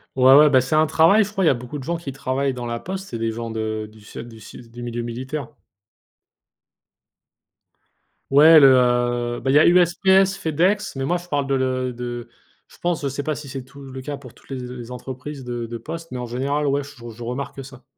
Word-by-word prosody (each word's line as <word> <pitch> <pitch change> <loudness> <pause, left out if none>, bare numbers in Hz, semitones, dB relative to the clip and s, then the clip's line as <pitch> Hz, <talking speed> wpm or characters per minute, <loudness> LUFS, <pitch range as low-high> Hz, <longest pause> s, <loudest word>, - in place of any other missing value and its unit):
Ouais, 130 0 +6
ouais, 150 0 +8
bah, 130 - +5
c'est 130 +4 -2
un 155 0 +4
travail, 165 +9 +5
je 205 - -7
crois, 195 -2 -1
il - - +4
y - - +7
a - - +3
beaucoup 125 +4 -7
de 135 - -7
gens 170 +5 -2
qui 165 -5 -7
travaillent 135 0 -2
dans 120 -1 -5
la 115 0 -3
poste, 190 +5 -6
c'est 115 - -5
des 115 0 -1
gens 115 0 -5
de 110 -1 -3
du 110 0 -18
se 105 - -13
du 115 -2 -10
su 115 +2 -12
du 120 +1 -11
milieu 120 0 -4
militaire. 130 +3 -5 2.8
Ouais, 155 +3 +8
le, 135 -2 +7
heu, 120 -1 +1
bah 130 - -3
il 135 - +3
y - - +8
a - - +5
USPS, 190 +2 +4
FedEx, 185 +3 0
mais 135 - -3
moi, 175 +5 +1
je 175 0 -11
parle 145 -4 -1
de 130 -1 0
de 120 -1 -6 0.4
je - - -19
pense, 175 -2 -1
je 140 - -1
sais 140 +1 -4
pas 155 - -1
si 145 -1 -8
c'est 135 -2 -6
tout 140 +2 -15
le 130 -1 -8
cas 145 0 -5
pour 125 -4 -14
toutes - - -19
les 135 - -4 0.2
les 120 0 -9
entreprises 130 +3 -7
de 120 -1 -4
de 115 0 -6
poste, 165 +7 -8
mais 125 - -5
en 125 - -5
général, 140 +5 -1
ouais, 140 +1 +1
je 135 -4 -11
je 115 +1 -10
remarque 130 +2 -5
ça. 130 -2 -14
135 Hz, 235 wpm, -22 LUFS, 120-150 Hz, 2.8 s, ouais